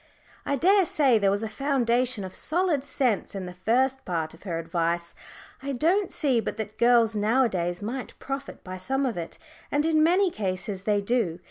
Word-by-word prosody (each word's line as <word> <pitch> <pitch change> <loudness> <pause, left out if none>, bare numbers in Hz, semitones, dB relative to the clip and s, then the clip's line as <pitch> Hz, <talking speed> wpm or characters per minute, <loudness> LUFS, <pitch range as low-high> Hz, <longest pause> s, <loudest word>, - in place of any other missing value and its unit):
I 285 - +1
daresay 310 - +4
there 200 -1 +3
was 200 +2 0
a - - -1
foundation 245 -2 0
of 185 -1 -7
solid 330 -4 +1
sense 255 -8 -1
in 190 -2 -4
the 180 - -7
first 255 +8 +1
part 165 -3 -3
of - - -16
her 175 -5 -4
advice. 170 +1 -2 0.5
I 280 +1 -3
don't 350 +9 +1
see 265 -6 +1
but 220 - -4
that 215 -1 -6
girls 235 -2 +4
nowadays 205 -5 +1
might 245 +4 -5
profit 275 +1 -6
by 185 0 -7
some 270 +9 0
of 245 - -1
it. 170 -2 -6 0.3
And 290 +1 +1
in 315 -1 +3
many 360 +4 +4
cases 190 - -3
they 205 -1 +2
do. 200 -6 0
235 Hz, 180 wpm, -26 LUFS, 190-275 Hz, 0.5 s, daresay